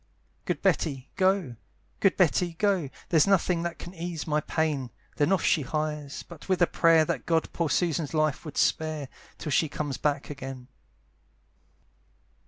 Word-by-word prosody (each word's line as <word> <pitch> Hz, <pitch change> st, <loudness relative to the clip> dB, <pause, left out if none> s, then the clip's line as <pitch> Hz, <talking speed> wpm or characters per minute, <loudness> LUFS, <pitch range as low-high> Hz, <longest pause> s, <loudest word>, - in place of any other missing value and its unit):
"Good -, -, -2 dB
Betty 135 Hz, -4 st, 0 dB
go, 185 Hz, -, +1 dB, 0.4 s
good 195 Hz, -, +3 dB
Betty 175 Hz, -1 st, +2 dB
go, 185 Hz, -4 st, +1 dB, 0.2 s
"There's 165 Hz, -2 st, +4 dB
nothing 180 Hz, -3 st, +2 dB
that 170 Hz, 0 st, -3 dB
can 175 Hz, -, -9 dB
ease 170 Hz, -2 st, -5 dB
my 150 Hz, -1 st, +1 dB
pain." 150 Hz, -5 st, -1 dB, 0.3 s
Then 145 Hz, +4 st, +2 dB
off 190 Hz, -3 st, +2 dB
she 155 Hz, -, +3 dB
hies, 150 Hz, 0 st, -3 dB
but 170 Hz, +1 st, -13 dB
with 185 Hz, -, +2 dB
a -, -, +7 dB
prayer 165 Hz, -2 st, +4 dB
That -, -, -3 dB
God 165 Hz, -1 st, +1 dB
poor 170 Hz, -3 st, 0 dB
Susan's 165 Hz, -3 st, 0 dB
life 155 Hz, -2 st, +1 dB
would 150 Hz, -4 st, -8 dB
spare, 155 Hz, -4 st, 0 dB, 0.3 s
Till 150 Hz, -, -5 dB
she 155 Hz, +3 st, +2 dB
comes 145 Hz, -3 st, -3 dB
back 145 Hz, -1 st, -1 dB
again. 135 Hz, -2 st, -8 dB
155 Hz, 160 wpm, -27 LUFS, 145-170 Hz, 0.4 s, a